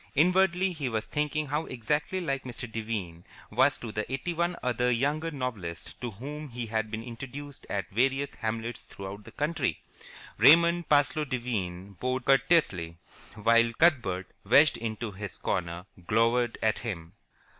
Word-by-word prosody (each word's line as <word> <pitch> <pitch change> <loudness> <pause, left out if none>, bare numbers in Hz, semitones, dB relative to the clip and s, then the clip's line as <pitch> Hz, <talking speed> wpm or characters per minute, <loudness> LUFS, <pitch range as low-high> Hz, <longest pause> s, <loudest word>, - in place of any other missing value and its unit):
Inwardly 180 +3 +4
he 150 -7 -3
was 110 -2 -2
thinking 150 +1 -1
how 150 +3 -2
exactly 150 +9 -1
like 135 -6 -1
Mr. 125 0 -6
Devine 110 -7 -4 0.3
was - - +4
to 115 - -6
the 105 +3 -3
eighty 135 +6 -2
one 170 +1 0
other 125 0 +1
younger 145 +7 +1
novelists 115 - -5
to 120 - -2
whom 145 +8 -7
he 120 -1 -4
had 110 -1 -1
been 110 +1 -4
introduced 135 +4 -8
at 100 -1 -2
various 135 +5 +1
hamlets 115 +1 -4
throughout 100 +1 -8
the - - -11
country. 150 +2 -1 0.6
Raymond 170 +2 +6
Parsloe 145 +1 +3
Devine 100 -8 -3
bowed 130 0 -1
courteously, 120 - +3 0.4
while 115 +2 +4
Cuthbert, 115 - +2
wedged 140 +9 +5
into 115 -1 -4
his 100 0 -6
corner, 85 -1 -2 0.2
glowered 115 +2 +2
at 110 0 +2
him. 85 -8 -5
120 Hz, 145 wpm, -29 LUFS, 110-145 Hz, 0.6 s, Raymond